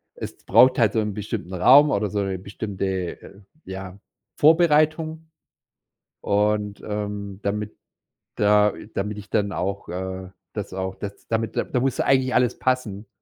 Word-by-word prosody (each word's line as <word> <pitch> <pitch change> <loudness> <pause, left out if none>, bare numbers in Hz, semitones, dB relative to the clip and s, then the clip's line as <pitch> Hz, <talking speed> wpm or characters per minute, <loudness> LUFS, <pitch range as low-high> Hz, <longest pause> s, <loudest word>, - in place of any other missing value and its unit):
Es - - -8
braucht 130 0 +6
halt 115 -3 +3
so 110 - +2
'n 105 -2 -1
bestimmten 105 -2 -5
Raum 135 +11 +7
oder 105 -4 0
so 105 +1 -2
'ne 95 -1 -2
bestimmte 100 +1 -5 0.4
äh, 100 +1 -14 0.2
ja, 95 0 -8 0.4
Vorbereitung. 160 0 +3 0.9
Und, 105 0 0
ähm, 105 -1 -4
damit 105 +1 -3 0.6
da 105 0 +4 0.2
damit 105 +1 -3
ich 105 0 -10
dann 100 -2 +1
auch 100 +2 -3
äh, 95 +1 -5 0.2
das 105 -3 -5
auch 95 0 -3
das 100 -1 -8
damit 115 -1 -2
da 125 - 0
muss 130 0 -1
eigentlich 130 -1 +2
alles 125 -1 +2
passen. 115 -5 -1
105 Hz, 145 wpm, -23 LUFS, 100-125 Hz, 0.9 s, Raum